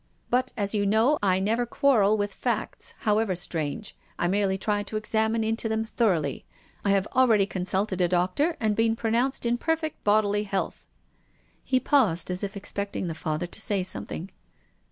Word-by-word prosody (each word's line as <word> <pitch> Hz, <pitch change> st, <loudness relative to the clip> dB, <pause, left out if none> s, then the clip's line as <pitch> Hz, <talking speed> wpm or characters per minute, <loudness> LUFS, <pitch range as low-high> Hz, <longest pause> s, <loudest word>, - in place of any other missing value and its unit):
But, 250 Hz, +1 st, +1 dB
as 200 Hz, -1 st, -1 dB
you 205 Hz, -1 st, +1 dB
know, 225 Hz, +8 st, +3 dB
I 190 Hz, -2 st, +2 dB
never 220 Hz, +5 st, +1 dB
quarrel 220 Hz, -6 st, +3 dB
with 205 Hz, -1 st, -2 dB
facts, 230 Hz, -3 st, -3 dB
however 210 Hz, -2 st, +1 dB
strange. 170 Hz, +3 st, -3 dB, 0.2 s
I 175 Hz, -, 0 dB
merely 195 Hz, 0 st, +1 dB
try 205 Hz, +1 st, 0 dB
to 215 Hz, +1 st, -4 dB
examine 220 Hz, +1 st, 0 dB
into 225 Hz, +1 st, -1 dB
them 220 Hz, 0 st, 0 dB
thoroughly. 190 Hz, -, 0 dB, 0.4 s
I 200 Hz, -, +1 dB
have 195 Hz, -1 st, +3 dB
already 230 Hz, -6 st, +5 dB
consulted 190 Hz, 0 st, -1 dB
a 175 Hz, -, +4 dB
doctor 185 Hz, -, +1 dB
and 215 Hz, -2 st, +1 dB
been 225 Hz, 0 st, +2 dB
pronounced 235 Hz, +4 st, 0 dB
in 240 Hz, +1 st, +1 dB
perfect 325 Hz, 0 st, -2 dB
bodily 205 Hz, 0 st, +3 dB
health. 195 Hz, -2 st, -3 dB, 0.7 s
He 255 Hz, -, +2 dB
paused, 190 Hz, -, +2 dB
as 180 Hz, +2 st, -4 dB
if 200 Hz, +1 st, -4 dB
expecting 200 Hz, -2 st, -4 dB
the -, -, -3 dB
Father 155 Hz, +1 st, -3 dB
to 175 Hz, +5 st, -4 dB
say 200 Hz, -3 st, +1 dB
something. 185 Hz, 0 st, -4 dB
210 Hz, 170 wpm, -26 LUFS, 190-225 Hz, 0.7 s, already